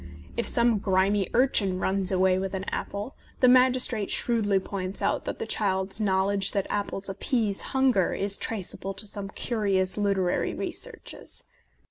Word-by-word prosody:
If 235 - -1
some 235 -3 +3
grimy 195 0 +1
urchin 220 -7 +2
runs 190 0 -1
away 185 0 +3
with 195 0 -3
an 190 - -3
apple, 205 +6 -4 0.3
the 255 - +5
magistrate 250 -4 +4
shrewdly 215 -5 +1
points 190 0 -5
out - - -1
that - - -4
the 455 - -4
child's 190 - 0
knowledge 195 -1 +2
that 200 -2 0
apples 200 -1 -2
appease 205 +1 -1
hunger 260 -8 +2
is 200 0 0
traceable 195 -2 -2
to 200 +3 -4
some 200 -1 -4
curious 195 -4 -1
literary 195 -3 0
researches. - - -4
200 Hz, 145 wpm, -27 LUFS, 190-225 Hz, 0.3 s, the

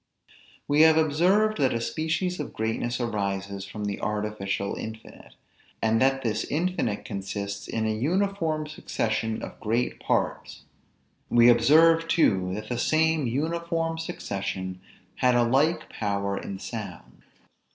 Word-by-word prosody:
We 145 +1 +4
have 160 0 +7
observed 180 +8 +3
that 130 -4 +2
a - - 0
species 160 +9 -2
of 150 - -5
greatness 115 +2 -2
arises 100 -4 -2
from 105 +2 -6
the 100 -1 -3
artificial 105 -2 -2
infinite; 110 0 -9 0.4
and 110 0 +2
that 135 0 +2
this 110 -2 0
infinite 155 - -1
consists 100 -1 -5
in 110 -1 -2
an 110 0 -1
uniform 165 -1 0
succession 110 -7 -2
of - - -8
great 115 +3 -1
parts: - - -2 0.7
we 120 0 +6
observed 160 +7 +5
too, 95 - +2
that 105 +1 -6
the 120 -1 -2
same 160 -1 +2
uniform 165 +4 -1
succession 95 - -4 0.4
had 125 -1 +3
a 120 - +4
like 150 +7 +2
power 100 -2 -2
in 100 0 -5
sounds. 100 -5 -8
120 Hz, 130 wpm, -26 LUFS, 105-160 Hz, 0.7 s, have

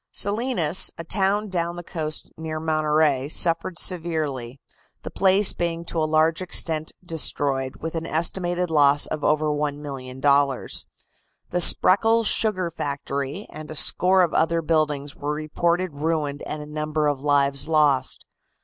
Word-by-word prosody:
Salinas, 205 - +2
a 165 - -6
town 200 +4 -1
down 170 -2 -3
the 175 - -8
coast 155 -3 -5
near 160 -1 -6
Monterey, 155 -3 0
suffered 165 +2 +2
severely, 155 -9 -2 0.4
the - - -7
place 195 +1 +3
being 170 -1 -3
to 165 - -3
a 155 -1 -1
large 160 +2 +2
extent 160 -3 -1
destroyed, 140 -5 -1
with 165 0 -5
an 165 -1 -4
estimated 175 +2 -1
loss 145 -2 +5
of 150 - -5
over 155 +1 +1
$1,000,000. 140 -2 -1 0.7
The 180 - 0
Spreckels' 225 +6 +5
sugar 185 -5 0
factory 140 +3 -5
and 155 0 -10
a 155 - -7
score 185 +4 +5
of 170 - -1
other 165 +1 +1
buildings 150 -3 -1
were 145 +1 -4
reported 170 +3 -2
ruined 145 -1 -3
and 150 0 -6
a - - -10
number 155 0 -3
of 145 -2 -1
lives 140 -1 +1
lost. 145 -5 +1
155 Hz, 140 wpm, -23 LUFS, 145-170 Hz, 0.7 s, loss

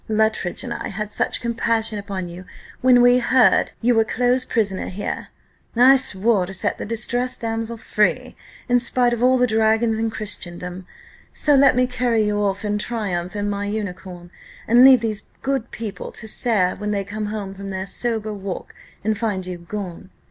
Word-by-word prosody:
Luttridge 220 -4 0
and - - -4
I - - -5
had 210 +1 -5
such - - -1
compassion 230 -2 -1
upon 195 -3 -5
you, 175 +2 -9 0.4
when 245 -1 +5
we 245 +1 +6
heard 250 -5 +3
you 245 +1 +3
were 225 -1 +4
close 245 +3 +1
prisoner 205 -7 -1
here! 200 +2 -4 0.5
I 255 +3 +7
swore 205 -5 +2
to 195 - -4
set - - -2
the - - -5
distressed 240 +3 0
damsel 225 0 -3
free, 215 -1 0 0.3
in 245 -1 +3
spite 245 0 +2
of 240 - -3
all 255 +1 +4
the 250 - +3
dragons 220 0 +2
in 225 0 0
Christendom; 180 -4 -6 0.5
so 295 - +2
let 275 -2 +5
me 250 0 +3
carry 245 -3 0
you 210 0 0
off 200 +1 -1
in 210 0 -1
triumph 200 -6 -3
in 205 0 -2
my 205 0 -2
unicorn, 185 -4 -6 0.4
and 240 +3 +6
leave 260 -3 +8
these 215 -2 -2 0.2
good 265 -3 -1
people 210 -4 -6
to 220 - -8
stare 210 -5 +2
when 210 - -4
they 200 -1 -1
come 210 +2 -5
home 205 -2 -5
from 195 0 -8
their 190 0 -4
sober 220 +1 -1
walk, 195 -2 -6 0.3
and 215 +1 +1
find 205 -5 -2
you 180 -1 -6
gone. 185 0 -7
215 Hz, 185 wpm, -21 LUFS, 195-235 Hz, 0.5 s, leave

